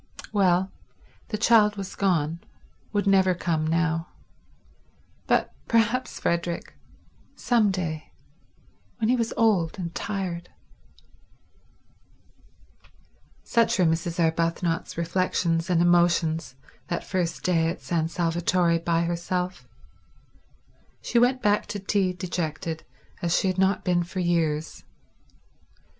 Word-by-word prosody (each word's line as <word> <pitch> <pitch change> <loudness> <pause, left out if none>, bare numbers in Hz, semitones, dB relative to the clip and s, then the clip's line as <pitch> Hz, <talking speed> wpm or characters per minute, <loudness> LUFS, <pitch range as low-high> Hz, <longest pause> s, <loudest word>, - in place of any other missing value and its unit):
Well, 190 -2 +3 0.6
the 215 - -3
child 215 -1 +4
was 195 -2 -6
gone, 170 -4 0 0.5
would 205 -1 0
never 190 -2 +4
come 160 -3 -1
now; 165 +1 0 1.2
but - - +1
perhaps 230 +3 +1
Frederick—some 175 +6 -2
day—when 160 - -7
he 250 - +4
was 230 -2 -1
old 200 -7 +2
and 170 -3 -5
tired... 180 -4 -4 2.9
Such 230 -1 +2
were 185 - +3
Mrs. 165 +1 0
Arbuthnot's 165 0 0
reflections 170 0 0
and 170 -1 +3
emotions 170 -4 +2 0.3
that 175 - -3
first 175 -3 -2
day 165 -3 +2
at 170 - -6
San 165 -2 0
Salvatore 170 0 +1
by 170 0 +1
herself. 175 -3 -3 1.4
She 235 - +2
went 255 +1 +2
back 205 -1 +2
to 205 - -4
tea 195 -1 +1
dejected 170 -3 -4 0.4
as 170 -1 +1
she 190 - +1
had 185 0 -2
not 190 0 +2
been 175 -1 +2
for 180 +2 -5
years. 165 -3 -1
175 Hz, 105 wpm, -25 LUFS, 165-195 Hz, 2.9 s, child